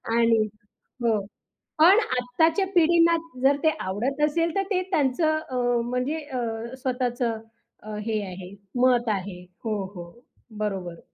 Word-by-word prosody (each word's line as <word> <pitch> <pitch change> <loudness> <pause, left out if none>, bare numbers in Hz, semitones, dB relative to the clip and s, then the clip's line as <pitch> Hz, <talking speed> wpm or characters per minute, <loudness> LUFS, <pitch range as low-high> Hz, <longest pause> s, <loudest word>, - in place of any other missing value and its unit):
आणि 230 -2 +3 0.6
हो, 225 -3 +3 0.6
पण 370 +7 +8
आत्ताच्या 315 +10 +2
पिढींना 335 0 +5 0.3
जर 280 +1 +5
ते 315 - +6
आवडत 245 +10 -2
असेल, 330 +3 0
तर 390 - +2
ते 370 -1 +2
त्यांचं 310 +1 +2
अ, 255 - -5 0.3
म्हणजे 250 +5 -1
अ, 240 -4 -4
स्वतःचं 245 -3 -1 0.4
अ, 215 0 -6
हे 215 -2 0
आहे, 180 0 -8 0.3
मत 245 -2 +4
आहे. 190 -3 -3 0.2
हो, 215 -1 0 0.2
हो. 170 -1 -8 0.5
बरोबर. 185 -5 -3
250 Hz, 130 wpm, -25 LUFS, 215-310 Hz, 0.6 s, पण